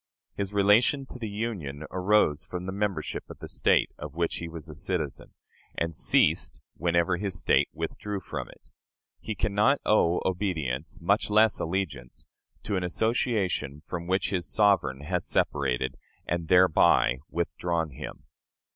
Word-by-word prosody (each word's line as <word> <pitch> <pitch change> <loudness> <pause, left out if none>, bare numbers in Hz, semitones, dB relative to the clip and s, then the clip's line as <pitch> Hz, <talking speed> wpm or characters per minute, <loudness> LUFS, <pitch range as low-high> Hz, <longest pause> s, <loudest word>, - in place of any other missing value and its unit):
His 100 -1 -3
relation 105 +7 +4
to 125 - -9
the 110 -3 -4
Union 100 -10 -4
arose 90 -5 +2
from 90 +3 -6
the 95 - -3
membership 100 0 -3
of - - -9
the - - -8
State - - +2
of 75 0 -7
which 85 -1 -1
he 85 - -5
was 80 -3 -8
a - - -9
citizen, - - -3 0.4
and 85 0 -1
ceased - - +3 0.2
whenever 85 +1 +1
his 95 -2 -3
State - - +3
withdrew 105 -1 -4
from - - -6
it. - - -18 0.5
He 110 - -5
can 100 - -1
not 120 +8 +4
owe 90 -5 +3
obedience 80 -7 -2
much 100 +6 +1
less 110 +1 +4
allegiance 80 -9 -4 0.4
to 100 - -2
an 90 - -1
association 90 - 0
from 85 -1 -5
which 95 +2 0
his 90 -4 -2
sovereign 100 -11 +2
has 90 +4 -2
separated, 65 -3 0 0.3
and 85 -1 -2
thereby 80 -8 +5
withdrawn 85 -1 -2
him. 65 - -8
90 Hz, 150 wpm, -27 LUFS, 80-105 Hz, 0.5 s, thereby